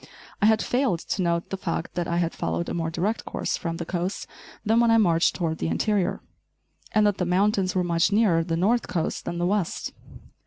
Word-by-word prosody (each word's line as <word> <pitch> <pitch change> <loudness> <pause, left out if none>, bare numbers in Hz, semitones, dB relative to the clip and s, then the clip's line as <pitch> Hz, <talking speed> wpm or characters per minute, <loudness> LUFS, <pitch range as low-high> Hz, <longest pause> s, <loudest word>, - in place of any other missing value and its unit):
I 210 - +5
had 220 0 +3
failed 245 -9 +1
to 195 - -2
note 170 -1 -1
the 195 - -2
fact 170 -3 -3
that 175 -1 -2
I 170 - -1
had 170 -1 0
followed 80 +1 -2
a - - -3
more 165 -1 -1
direct 190 +7 -1
course - - -2
from 165 -1 -4
the 170 - -4
coast 180 +2 -3 0.4
than 225 +2 +3
when 235 -1 +4
I 225 - +5
marched 170 -6 +3
toward 165 -3 -2
the - - -1
interior, 200 +1 0 0.7
and 215 -1 +3
that 205 -2 +1
the - - +1
mountains 190 +1 +1
were 185 - +2
much 170 +2 +2
nearer 200 -6 +3
the 165 0 -2
north 220 +7 +2
coast 165 -2 -2
than 170 - -3
the 175 - 0
west. 195 -2 -1
180 Hz, 220 wpm, -25 LUFS, 170-210 Hz, 0.7 s, I